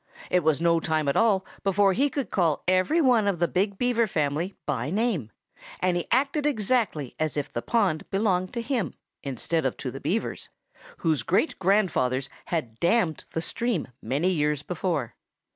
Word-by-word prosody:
It 180 -2 +3
was 155 -2 +2
no 170 0 +3
time 155 -2 0
at 140 - +1
all 200 -4 +3 0.2
before 195 0 +3
he 280 +8 +2
could 275 -1 -3
call 165 -7 +1
every 185 - +3
one 245 -7 +4
of 195 -3 +1
the 175 +1 +2
big 195 +3 0
Beaver 240 -1 +2
family 155 +2 -1
by 140 -2 -1
name. 195 - 0 0.5
And 180 -1 +1
he 175 - -2
acted 280 +4 +2
exactly 215 - 0
as 155 -1 -1
if 145 - -3
the 120 - -2
pond 155 - 0
belonged 190 -2 +1
to 235 -1 -3
him, 230 - -2 0.3
instead 140 +5 -2
of 130 - -1
to - - -4
the - - -8
Beavers, - - -2 0.5
whose 155 -6 +1
great 185 - +1
grandfathers 165 -10 +1 0.2
had 125 -10 -3
dammed 175 -4 +1
the 165 - -1
stream 235 +6 -1
many 150 +8 0
years 150 -3 0
before. 160 - -2
180 Hz, 175 wpm, -26 LUFS, 150-220 Hz, 0.5 s, one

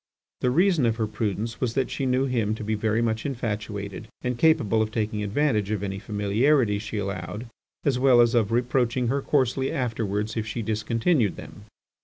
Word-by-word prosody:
The 125 - +1
reason 170 -1 +3
of 115 - +1
her 110 -1 0
prudence 110 +1 -3
was 120 -3 -1
that 135 -2 0
she 135 - -2
knew 130 +1 +2
him 115 -5 0
to 110 - -7
be 110 +1 -1
very 110 +2 +1
much 110 -1 -1
infatuated 110 -5 -4 0.2
and 125 0 -1
capable 115 -7 +3
of 110 - 0
taking 110 -1 -2
advantage 105 -1 0
of 105 -2 -2
any 95 -1 -3
familiarities 105 +2 +1
she 110 0 -5
allowed 100 +2 -4 0.4
as 135 -4 +1
well 130 -2 +5
as 120 -1 +5
of 115 -3 +2
reproaching 120 0 +1
her 140 +2 0
coarsely 135 -1 +1
afterwards 110 -4 -2
if 110 -1 -2
she 115 +1 -3
discontinued 110 - +1
them. - - -11
115 Hz, 185 wpm, -25 LUFS, 105-125 Hz, 0.4 s, well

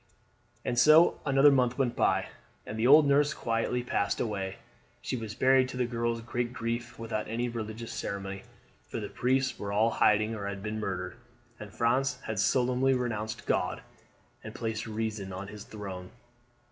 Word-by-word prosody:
And 120 - +1
so 155 +6 +6
another 135 +1 +6
month 125 -2 +2
went 130 -3 0
by, - - +3 0.4
and - - -6
then - - -5
the 115 +2 +2
old 150 +3 +8
nurse 145 +1 +3
quietly 115 +2 -1
passed 100 -4 -1
away. 95 -4 -2 0.4
She - - -3
was 110 -3 -5
buried, 130 0 +4
to 130 - -6
the 125 - +1
girls' 115 -1 -2
great 120 +1 -3
grief, 115 +1 -4
without 115 -2 -3
any 120 +2 -1
religious 115 0 -6
ceremony, 100 -1 -4 0.5
for - - -4
the - - -5
priests 130 +1 0
were 100 -1 -4
all 110 +3 +3
in - - -6
hiding 105 +1 +3
or 100 -3 -4
had 100 -1 -5
been 110 0 -3
murdered, 90 -1 -4 0.4
and 105 -1 -9
France 130 +5 +1
had 110 -3 -3
solemnly 130 +3 +2
renounced 110 -3 -3
God - - 0 0.6
and - - -8
placed 115 -1 -3
Reason 110 -3 -3
on 95 +2 -6
His 105 -1 -9
throne. 95 -4 -7
115 Hz, 175 wpm, -29 LUFS, 105-125 Hz, 0.6 s, old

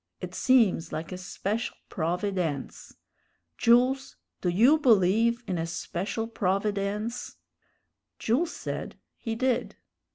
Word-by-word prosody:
It - - -7
seems 220 -10 +3
like 160 +3 -5
a 185 - -4
special 200 +5 -3
provi_dence_. 175 -4 -2 0.6
Jools, 255 +3 +3 0.3
do 180 - +1
you 240 - +5
believe 230 - +3
in 180 -3 -2
a 165 - -2
special 190 +6 -3
provi_dence_?" 205 +2 -2 0.8
Jules 290 +10 +1
said - - -5 0.2
he 225 -1 -3
did. 255 +1 0
210 Hz, 105 wpm, -27 LUFS, 180-235 Hz, 0.8 s, you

